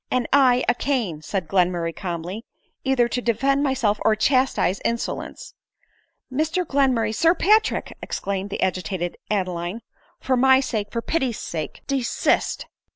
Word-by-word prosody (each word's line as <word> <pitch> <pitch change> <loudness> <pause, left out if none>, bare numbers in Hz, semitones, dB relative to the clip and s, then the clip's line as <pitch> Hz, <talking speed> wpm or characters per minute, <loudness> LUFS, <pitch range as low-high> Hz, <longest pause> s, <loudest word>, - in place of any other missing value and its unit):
" - - -46
And 250 -2 +1
I 255 -3 +5
a 245 - +4
cane," 240 - -2
said 180 +2 -3
Glenmurray 175 -2 +1
calmly, 180 +3 -5 0.2
" - - -47
either 265 -3 +2
to 245 +1 -2
defend 270 +4 +1
myself 240 -7 +1
or 220 - +4
chastise 255 -5 +2
insolence." 235 - -3 0.4
" - - -23
Mr 315 +6 0
Glenmurray! 265 -7 +2
t - - -3
Sir 330 +9 +3
Patrick 425 +5 +2
!" - - -39
exclaimed 195 0 -3
the - - -4
agi 185 0 0
tated 175 0 -3 0.2
Adeline; 185 0 -2 0.2
" - - -36
for 260 - 0
niy 265 +1 +5
sake, 210 -5 -3
for 230 -1 -3
pity's 265 -8 -1
sake, 160 -2 -5
desist." 270 -4 0
235 Hz, 165 wpm, -23 LUFS, 190-265 Hz, 0.4 s, I